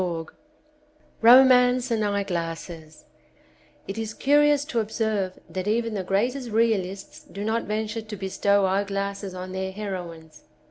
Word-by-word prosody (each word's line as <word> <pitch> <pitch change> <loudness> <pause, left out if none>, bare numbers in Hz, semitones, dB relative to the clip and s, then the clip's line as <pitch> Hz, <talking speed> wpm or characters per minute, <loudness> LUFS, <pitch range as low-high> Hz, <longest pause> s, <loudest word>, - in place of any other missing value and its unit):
219 165 -3 -4 0.9
Romance 250 +1 +6
and 220 -2 +1
Eyeglasses 170 -5 -4 0.8
IT 195 +3 -5
is 220 -1 -5
curious 290 0 +3
to 265 -7 -2
observe 215 -3 -2
that 185 +1 -5
even 230 +1 0
the 195 -3 -3
greatest 240 +7 -1
reaUsts 205 -4 -1
do 200 - -6
not 225 +2 -1
venture 215 +1 -3
to 215 -1 -8
bestow 200 +1 +1
eyeglasses 200 0 -2
on 185 0 -7
their 190 0 -3
heroines. 175 -6 -7
200 Hz, 130 wpm, -25 LUFS, 190-230 Hz, 0.9 s, Romance